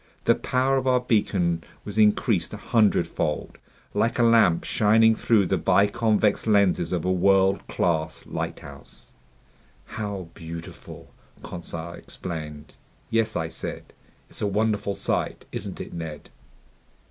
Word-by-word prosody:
The - - +6
power 130 +1 +1
of 130 0 -1
our 125 -1 +4
beacon 95 -8 0 0.2
was 105 +1 -3
increased 105 -1 +2
a - - -7
hundredfold, 105 -8 0 0.3
like 115 - +1
a 120 - +3
lamp 110 -8 +4
shining 110 +1 +4
through 110 -2 +2
the - - 0
biconvex 105 +1 +2
lenses 100 -5 +3
of 90 -2 -1
a 95 - +2
world 95 +1 +3
class 80 -2 -1
lighthouse. - - -7 0.7
"How 100 -5 -5
beautiful!" 85 0 -10 0.3
Conseil 85 -1 -6
exclaimed. 75 -5 -8 0.4
"Yes," 110 -1 +1
I 80 - -1
said, - - -8 0.3
"it's - - -12
a 105 - +1
wonderful 105 -1 0
sight! - - -2
Isn't - - -5
it, - - -7
Ned?" 80 -3 -7
100 Hz, 125 wpm, -25 LUFS, 85-110 Hz, 0.7 s, The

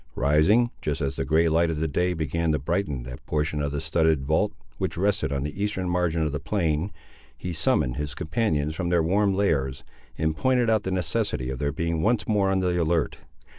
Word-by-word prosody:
Rising, 80 - +3
just 75 +1 -2
as 70 -3 -2
the - - -2
grey 80 +2 +3
light 80 +1 +3
of 80 -1 -1
day 90 +3 +1
began 80 +1 -1
to - - +2
brighten 75 -3 -2
that 60 0 -9
portion 75 0 -1
of 70 -1 -1
the 75 - -2
studded 80 -2 +1
vault 80 +4 +1 0.3
which - - -2
rested 100 -4 +1
on 70 -1 -1
the 75 +8 -4
eastern 95 -3 -1
margin 90 -2 +1
of 75 - 0
the 75 - -3
plain, 85 +1 -1 0.5
he 90 -1 -5
summoned 70 -5 +1
his 75 -1 -4
companions 80 -5 0
from 85 +1 -2
their 85 -2 +3
warm 100 +3 +2
lairs, 70 -10 0 0.3
and 80 0 0
pointed 125 +6 +2
out 110 -2 +3
the 95 - -3
necessity 95 - -1
of 65 - -5
their 70 0 0
being 85 0 -1
once 110 +2 +1
more 100 -3 +2
on 95 - +2
the 90 -1 +1
alert. 80 -1 0
80 Hz, 210 wpm, -25 LUFS, 75-95 Hz, 0.5 s, Rising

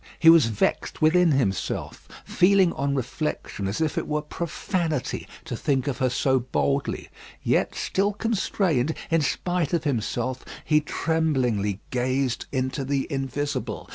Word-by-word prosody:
He 165 0 +8
was 165 -7 +6
vexed 110 -3 -1
within 170 0 +5
himself, 110 -9 -2 0.2
feeling 185 -1 +4
on 140 0 -1
reflection 130 -6 -3
as 100 - -2
if 160 -2 0
it - - -5
were 150 0 -1
profanity 165 -1 -2 0.2
to - - -4
think 135 -3 0
of 140 - -2
her 130 - +2
so 130 +2 +2
boldly; 135 +3 -1 0.3
yet - - +1
still 200 +2 0
constrained, 190 - 0 0.2
in 165 -1 +4
spite 175 +2 -1
of 170 - +1
himself, 130 -1 -2 0.2
he 150 -1 +4
tremblingly 130 - 0
gazed 130 0 0
into 130 +1 -1
the 135 0 0
invisible. 140 +1 -3
140 Hz, 140 wpm, -25 LUFS, 130-165 Hz, 0.3 s, He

